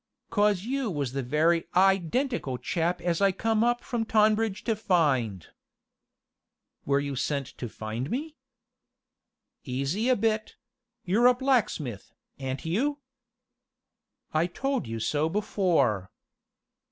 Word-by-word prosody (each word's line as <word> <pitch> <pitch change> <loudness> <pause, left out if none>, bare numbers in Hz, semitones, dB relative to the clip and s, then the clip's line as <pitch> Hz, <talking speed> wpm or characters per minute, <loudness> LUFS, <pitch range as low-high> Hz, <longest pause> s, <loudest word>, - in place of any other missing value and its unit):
"'Cos 205 -3 +2
you 260 +1 -1
was 145 -8 -2
the 135 - -1
very 160 +6 +2
i 190 +1 +6
dentical 190 - -2
chap 175 +1 -1
as 175 +1 0
I 200 -1 +5
come 220 +3 +1
up 240 0 +1
from 240 -3 -2
Tonbridge 215 -1 +2
to 225 - 0
find." 145 - +1 1.4
"Were 140 0 +3
you 140 -1 -3
sent 140 +1 -1
to 120 - -4
find 110 +6 -5
me?" 300 +5 -3 1.3
"Easy 140 - -1
a 255 - +5
bit 220 0 -1 0.5
you're 215 +7 +4
a 250 - +5
blacksmith, 230 - -1 0.2
a'n't 135 +3 -4
you?" 260 - 0 1.4
"I 160 +2 +2
told 270 - -2
you 115 0 -4
so 150 +7 0
before." 165 - +1
180 Hz, 125 wpm, -27 LUFS, 140-225 Hz, 1.4 s, i